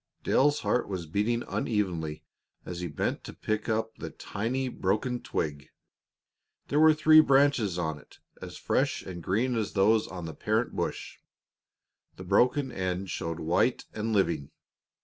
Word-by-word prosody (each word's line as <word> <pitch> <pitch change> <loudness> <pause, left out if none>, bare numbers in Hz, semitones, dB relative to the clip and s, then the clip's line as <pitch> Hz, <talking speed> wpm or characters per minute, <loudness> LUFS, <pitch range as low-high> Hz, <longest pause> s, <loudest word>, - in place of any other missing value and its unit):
Dale's 145 +2 +3
heart 125 - 0
was 95 -4 -4
beating 105 +9 0
unevenly 85 -9 -2 0.4
as 90 -1 -6
he 90 - -3
bent 75 - -2
to - - -8
pick 110 0 -2
up 110 0 -1
the - - -5
tiny 125 +6 -3
broken 120 +3 -1
twig. 75 -1 -3 1.0
There 145 - +2
were 155 0 +7
three 155 0 +7
leaves 135 - +3
on 80 -4 -2
it, - - -19 0.2
as - - -8
fresh - - 0
and 90 -2 -7
green 115 +9 0
as 110 -3 -2
those 105 +3 +3
on 90 -2 -7
the 80 - -6
parent - - -1
bush; - - -4 1.0
the 95 - -9
broken 125 +8 +2
end 95 -1 -3
showed 85 +1 -3
white 85 +10 +1
and 110 +1 -2
living. 85 -9 +1
105 Hz, 150 wpm, -28 LUFS, 85-125 Hz, 1.0 s, were